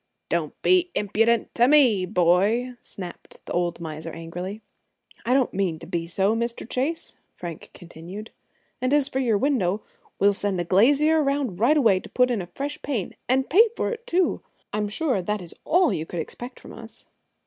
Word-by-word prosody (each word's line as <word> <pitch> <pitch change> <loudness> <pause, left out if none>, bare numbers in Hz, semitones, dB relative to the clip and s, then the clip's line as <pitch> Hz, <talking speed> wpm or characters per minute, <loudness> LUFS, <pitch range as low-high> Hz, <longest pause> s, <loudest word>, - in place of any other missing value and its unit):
"Don't - - -2
be 365 -1 +4
impudent 225 +3 +1
to 240 +1 +4
me, 250 -10 +5
boy!" 200 +7 +2
snapped 180 -3 -10
the - - -5
old 175 -1 -1
miser 160 0 -6
angrily. 175 +6 -7 0.6
"I 250 - +4
don't 265 -3 +2
mean 185 -4 0
to 165 - -11
be 170 -1 -3
so, 195 +5 +1
Mr. 235 0 -3
Chase," 275 +7 -3 0.2
Frank 170 -3 -8
continued; 175 +5 -9 0.5
"and 255 +3 +2
as 290 -2 +3
for 265 - -2
your 235 -5 +2
window, 210 -6 0 0.3
we - - +1
will 205 - +5
send 195 -2 -1
a - - 0
glazier 285 - +4
around 275 -9 -1
right 265 +8 +4
away 220 -9 +4
to - - -12
put 250 0 +2
in 225 -5 0
a 175 - -7
fresh 280 - -5
pane, 245 -10 -3
and 265 +1 +2
pay 440 - +6
for - - 0
it, 475 +1 -7
too. 370 -4 +1 0.3
I'm 210 0 -1
sure 255 - 0
that 210 +4 -2
is 175 -3 -7
all 355 0 +3
you 160 +1 -3
could 175 - -5
expect 245 +10 -7
from - - -12
us." 230 0 -11
220 Hz, 190 wpm, -24 LUFS, 180-270 Hz, 0.6 s, pay